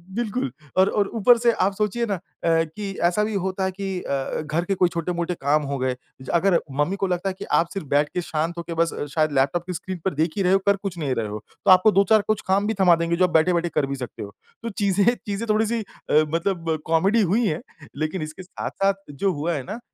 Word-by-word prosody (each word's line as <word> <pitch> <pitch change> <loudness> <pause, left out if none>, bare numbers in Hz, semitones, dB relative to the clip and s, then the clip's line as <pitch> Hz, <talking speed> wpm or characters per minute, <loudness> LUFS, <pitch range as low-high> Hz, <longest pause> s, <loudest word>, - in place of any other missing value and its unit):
बिल्कुल 235 - -2 0.3
और 190 +1 +5
और 205 -1 +1
ऊपर 235 +2 +5
से 235 0 +3
आप 195 -3 +1
सोचिए 215 +3 0
ना 210 - -1
अ, - - -8 0.3
कि 165 +5 0
ऐसा 175 +5 +3
भी 215 +1 -2
होता 190 0 -2
है 190 - 0
कि 190 -1 -4
अ, 135 +2 -2
घर 155 +2 -1
के 195 - 0
कोई 180 -1 +3
छोटे-मोटे 170 +1 -2
काम 145 +2 +3
हो 140 - -1
गए, 130 -1 -1 0.3
ज 130 - -10
अगर 175 +1 +4
मम्मी 145 +7 0
को 195 -1 -1
लगता 180 +1 -1
है 190 - -5
कि - - -5
आप 165 - +2
सिर्फ़ 195 -7 -5
बैठ 145 +1 +2
के 180 - -1
शांत 165 0 -2
होके 170 0 -5
बस 165 0 +1 0.2
शायद 155 -1 +2
लैपटॉप 140 +5 +1
की 180 - -3
स्क्रीन 185 +2 -5
पर 190 - +1
देख 160 +3 0
ही 195 - +1
रहे 180 +1 +3
हो, 195 - +5
कर 200 0 +4
कुछ 195 -3 -6
नहीं 140 -6 -1
रहे 110 -2 -1
हो 105 0 -6 0.2
तो - - +7
आपको 185 +4 +7
2-4 200 +2 +4
कुछ 215 -1 +1
काम 195 +2 +2
भी 220 - +1
थमा 180 -2 +7
देंगी 170 0 0
जो 185 - +4
आप - - 0
बैठे-बैठे 170 +1 +3
कर 150 - +2
भी 140 0 -3
सकते 125 -3 -7
हो। 100 0 -9 0.3
तो 230 - -2
चीज़ें 200 -2 +1 0.2
चीज़ें 205 +2 -3
थोड़ी-सी 220 +2 +2
अ, 205 - -8 0.2
मतलब 165 -1 -1
कॉमेडी 190 +8 +3
हुई 210 +5 +2
हैं 155 -2 -2 0.3
लेकिन 155 +5 -2
इसके 155 +4 -7
साथ-साथ 195 +2 -1 0.2
जो 190 +8 0
हुआ 160 +3 -2
है 140 -4 -3
ना, 195 - -6
अ, 230 - -7
180 Hz, 250 wpm, -23 LUFS, 160-200 Hz, 0.3 s, तो